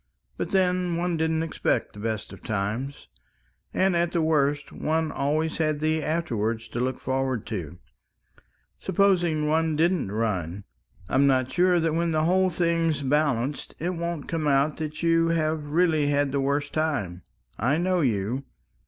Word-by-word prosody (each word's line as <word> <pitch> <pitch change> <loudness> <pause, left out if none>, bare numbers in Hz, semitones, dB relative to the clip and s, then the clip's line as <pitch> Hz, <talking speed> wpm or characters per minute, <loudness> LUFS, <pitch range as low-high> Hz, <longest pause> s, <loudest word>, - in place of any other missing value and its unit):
But - - -3
then 180 -2 +1
one 175 0 0
didn't 160 0 0
expect 165 - -1
the 105 - -11
best 110 -1 -3
of - - -12
times. 110 +7 -3 0.6
And 190 -1 +2
at 170 0 +1
the 170 - +2
worst, 145 -2 +1
one 160 0 -1
had - - -10
always 155 +4 0
the 155 0 +1
afterwards 115 -9 -1
to 120 - -4
look 130 +1 -1
forward 130 -3 -1
to... 90 -7 -5 1.0
supposing 175 -5 +2
one 160 0 +1
didn't 165 - +1
run.... 100 -4 -2 0.4
I'm 135 +7 +3
not 130 -1 +2
sure 180 +3 +3
that 165 -1 +1
when 165 0 0
the 155 0 +2
whole 185 +3 +3
thing's 165 -4 0
balanced, 140 -1 0
it 175 +3 -2
won't 170 -3 -4
come 160 -2 -1
out 140 +2 +2
that 155 +1 -5
you 165 0 +3
have 155 -2 0
really 155 -1 +2
had 145 -1 +1
the 140 0 0
worst 140 +1 -1
time. 130 - -1 0.4
I 130 +8 +2
know 180 +1 +1
you 120 +1 -1
155 Hz, 160 wpm, -26 LUFS, 130-165 Hz, 1.0 s, I'm